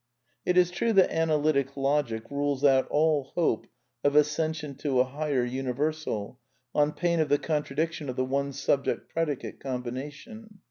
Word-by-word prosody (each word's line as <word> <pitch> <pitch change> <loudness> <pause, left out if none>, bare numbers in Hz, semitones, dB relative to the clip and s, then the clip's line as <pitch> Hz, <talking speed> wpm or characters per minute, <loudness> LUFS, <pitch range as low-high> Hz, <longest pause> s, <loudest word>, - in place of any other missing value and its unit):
It 180 - +2
is 180 -1 +5
true 225 +6 0
that 195 -2 +5
Analytic 150 -4 +1
Logic 135 -5 0
rules 140 -1 -1
out 135 -2 +5
all 150 -2 +2
hope 165 -10 +1 0.4
of 145 0 +2
ascension 150 0 +1
to 135 -4 0
a - - +6
highest 130 -2 -1
universal, 130 -3 -2 0.3
on 150 0 +2
pain 170 -1 0
of 155 -2 +1
the 145 - +4
contradic 155 +1 -1
tion 150 -4 -6
of 125 - -3
the 130 - 0
One 140 +1 -1
Subject 140 0 0
Predicate 160 -5 -2
combination. 145 - -6
145 Hz, 155 wpm, -28 LUFS, 135-155 Hz, 0.4 s, a